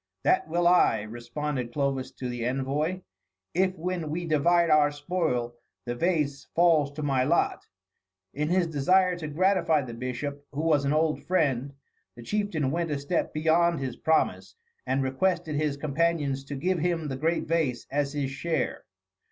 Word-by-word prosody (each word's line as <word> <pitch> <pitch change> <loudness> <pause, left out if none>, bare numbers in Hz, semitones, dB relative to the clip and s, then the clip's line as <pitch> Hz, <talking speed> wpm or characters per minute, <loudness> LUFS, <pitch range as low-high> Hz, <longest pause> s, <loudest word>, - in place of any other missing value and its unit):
"That - - +2
will 170 +2 +1
I," 145 -11 +4
responded 120 +3 -4
Clovis 140 -2 -1
to 125 - -5
the 120 -1 -4
envoy, 140 +8 -1 0.5
"if 185 +1 +1
when 175 -2 -3
we 170 +3 -3
divide 170 +2 +3
our 150 -1 +5
spoil 145 -5 -2 0.3
the 120 - -2
vase 145 -1 -1
falls 165 -5 +4
to 150 +1 -5
my 135 -3 +2
lot." 165 +6 +1 0.7
In 150 +2 -1
his 180 0 +3
desire 180 +4 +3
to 155 - -5
gratify 170 -1 +2
the 120 -2 -7
bishop, 130 +4 -5
who 145 - -2
was 155 -3 +2
an 140 - +1
old 155 0 +1
friend, 140 -6 0 0.4
the 120 - -11
chieftain 175 - -1
went 170 +1 -1
a 145 - -1
step 140 +5 -1
beyond 165 +2 +2
his 130 -2 -4
promise 160 0 0 0.3
and 135 +1 +1
requested 165 +4 0
his 150 -2 0
companions 145 -2 0
to 145 - -6
give 180 +6 0
him 165 -1 -1
the 135 - -3
great 160 +5 0
vase 155 -7 0
as 140 0 0
his 140 -2 -2
share. 155 -1 -2
150 Hz, 165 wpm, -27 LUFS, 135-170 Hz, 0.7 s, our